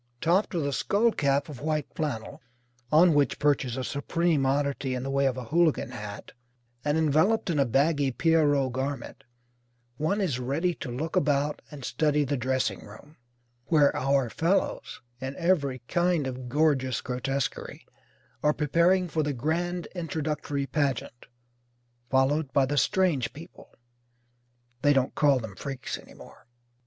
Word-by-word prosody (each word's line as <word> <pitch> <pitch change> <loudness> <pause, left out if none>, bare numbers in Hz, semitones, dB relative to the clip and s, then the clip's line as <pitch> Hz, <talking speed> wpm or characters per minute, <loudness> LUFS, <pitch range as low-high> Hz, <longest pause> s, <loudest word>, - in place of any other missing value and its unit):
Topped 180 - +1
with 160 -4 0
a 140 - -1
skull 220 - +2
cap 140 -5 +1
of 145 -6 -9
white 155 -1 -1
flannel 130 -8 -4 0.5
(on 165 +2 +6
which 145 -1 +2
perches 140 -4 +1
a 130 - -2
supreme 150 +1 0
oddity 140 -1 0
in 125 - -4
the 135 - -3
way 140 0 +2
of 130 -1 -1
a 130 - -4
Hooligan 160 +5 +1
hat) 105 -1 -8 0.5
and 150 +1 +1
enveloped 160 +7 +2
in 150 - 0
a 140 - +3
baggy 140 +3 +2
Pierrot 145 -2 +2
garment 130 0 -4 0.7
one 160 +7 0
is 160 -11 0
ready 145 +8 0
to 140 - -7
look 155 +9 -4
about 145 -4 +1
and 140 -4 -9
study 150 +4 +1
the 145 +1 -1
dressing 130 -5 -1
room, 130 +9 -14 0.5
where 150 -2 +3
our 135 -1 +1
fellows, 170 - -1 0.2
in 130 +1 -5
every 140 -8 0
kind 175 -4 +1
of 130 -1 -5
gorgeous 135 -2 +1
grotesquerie, 130 +2 -3 0.6
are 150 - +3
preparing 170 +5 +2
for 160 -1 -1
the 145 -1 -1
Grand 170 +7 -2
Introductory 155 -5 -3
Pageant 135 -4 -2 0.8
followed 135 +2 +2
by 140 - +4
the 145 +2 -2
"Strange 145 -5 +1
People." 165 +5 -13 1.1
(They 145 0 +4
don't 135 -2 +1
call 145 -3 +4
them 110 -5 -6
Freaks 135 +5 -5
any - - -16
more.) - - -15
145 Hz, 150 wpm, -27 LUFS, 130-160 Hz, 1.1 s, on